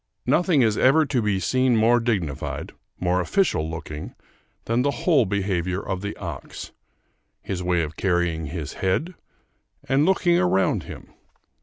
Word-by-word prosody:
Nothing 170 -7 +3
is 110 -2 +1
ever 150 +5 +5
to 130 -4 0
be 105 -3 0
seen 130 +4 +2
more 115 +2 +4
dignified, 100 - -3 0.3
more 90 0 +1
official 90 - +1
looking, 80 -2 -7 0.5
than 115 +2 +1
the 140 - +1 0.2
whole 145 - +4
behavior 95 -2 -1
of 95 -2 -4
the 100 +1 -5
ox; - - -7 0.7
his 95 -2 -4
way 90 -2 +1
of 75 +1 -6
carrying 85 -4 0
his 75 -1 -5
head, 95 - -1 0.7
and 135 +2 +3
looking 175 -2 +3
around 95 - +1
him. - - -11
100 Hz, 145 wpm, -24 LUFS, 90-130 Hz, 0.7 s, ever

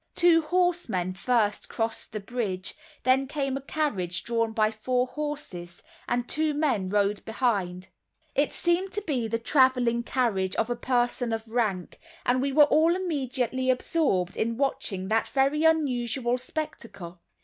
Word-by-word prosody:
Two 345 -2 +5
horsemen 330 - 0
first 210 0 0
crossed 225 0 -3
the 215 - -4
bridge, 200 -4 -3 0.3
then 265 +1 +3
came 275 -2 -2
a 275 - -3
carriage 210 - -2
drawn 230 -1 0
by 215 -1 +2
four 250 +3 0
horses, 255 -12 -6 0.2
and 240 0 -1
two 310 -1 0
men 255 -11 0
rode 205 0 +1
behind. 195 -6 -1 0.4
It 285 +1 +2
seemed 360 +2 0
to 415 - -3
be 260 - -1
the 230 +1 -1
traveling 250 -1 +3
carriage 225 -7 0
of 225 +2 0
a - - 0
person 245 -1 0
of 225 0 -3
rank; 215 -6 -2 0.3
and 255 +1 +2
we 275 +1 0
were 295 +2 +7
all 315 +4 +4
immediately 260 -7 -1
absorbed 250 - +1
in 230 +1 -1
watching 200 -8 -1
that 225 +1 +2
very 275 +3 +1
unusual 250 -5 +1
spectacle. 220 - -7
245 Hz, 150 wpm, -27 LUFS, 215-285 Hz, 0.4 s, were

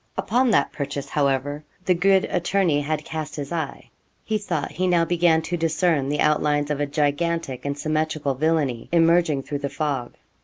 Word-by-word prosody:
Upon 250 +2 +2
that 140 -11 +2
purchase, 140 -1 -5
however, 145 +1 0 0.2
the 185 - +4
good 190 +2 +3
attorney 175 -4 +1
had 150 +1 -2
cast 155 -2 -5
his 140 -2 -6
eye. 160 -5 -4 0.3
He 215 -1 -1
thought 205 - -3
he 185 +1 -1
now 175 -2 +3
began 165 -2 +3
to 175 +2 -2
discern 160 -3 +1
the 150 0 0
outlines 150 -1 +2
of 145 - -1
a 145 - 0
gigantic 150 -1 -1
and 140 0 -2
symmetrical 155 -2 -1
villainy 145 -4 0
emerging 165 -4 +3
through 145 +1 -4
the 140 0 -3
fog. 140 -4 -3
155 Hz, 175 wpm, -23 LUFS, 145-170 Hz, 0.3 s, the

